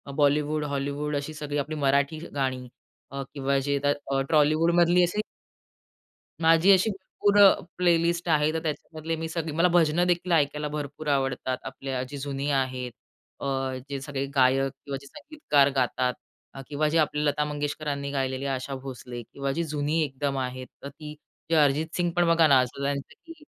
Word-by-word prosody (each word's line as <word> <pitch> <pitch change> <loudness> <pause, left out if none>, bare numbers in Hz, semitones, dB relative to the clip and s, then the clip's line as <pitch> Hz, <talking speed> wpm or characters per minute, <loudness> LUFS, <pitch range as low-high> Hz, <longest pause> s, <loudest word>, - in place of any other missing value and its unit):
Bollywood, 150 +1 +2
Hollywood 145 +1 -2
अशी 145 +2 -3
सगळी, 150 -1 -4
आपली 145 +2 -2
मराठी 140 +3 +2 0.2
गाणी 130 -2 -2 0.4
अ, 140 0 -4
किंवा 140 -1 0
जे 140 +1 0 0.5
ट्रॉलीवूड 155 +2 +4
मधली 175 +1 +5
अशी 175 +5 0 1.2
माझी 165 +3 +5
अशी 190 +3 +5 0.4
पूरं 205 -1 +6 0.2
प्ले 175 -2 +4
लिस्ट 170 +1 -1
आहे. 150 -1 +3
तर 160 - 0
त्याच्यामधले 160 +1 -4
मी 160 0 -4
सगळे 160 -1 -3
मला 170 +2 +4
भजनं 170 +1 +3
देखील 175 0 0
ऐकायला 150 -2 +1
भरपूर 150 0 -6
आवडतात. 135 -2 0
आपल्या 135 -2 -4
जी 145 - -6
जुनी 140 0 -3
आहेत. 130 -2 -1 0.5
अ, - - -5 0.4
जे 140 -1 -3
सगळे 135 0 -3
गायक 135 +1 +3
किंवा 140 -1 -3
संगीतकार 290 - +1
गातात 125 -1 +1 0.4
अ, - - -6
किंवा 150 +1 0
जी 165 - +1
आपली 150 -1 +1
लता 145 0 +1
मंगेशकरांनी 145 -1 -3
गायलेली, 135 -1 -2
आशा 135 0 -3
भोसले 125 -2 -7
किंवा 140 +4 -4
जी 165 +5 -1
जुनी 150 +2 0
एकदम 140 0 -2
आहेत. 130 0 -4 0.2
तर 140 - -5
ती 150 +1 -10 0.3
जे 165 - +2
अरिजित 150 +1 +3
सिंग 175 -1 0
पण 175 -1 +3
बघा 165 -1 +5
ना, 140 -3 +6
असं 130 +2 -2
त्यांच 140 0 0 0.2
की 330 - -9
145 Hz, 165 wpm, -26 LUFS, 135-160 Hz, 1.2 s, पूरं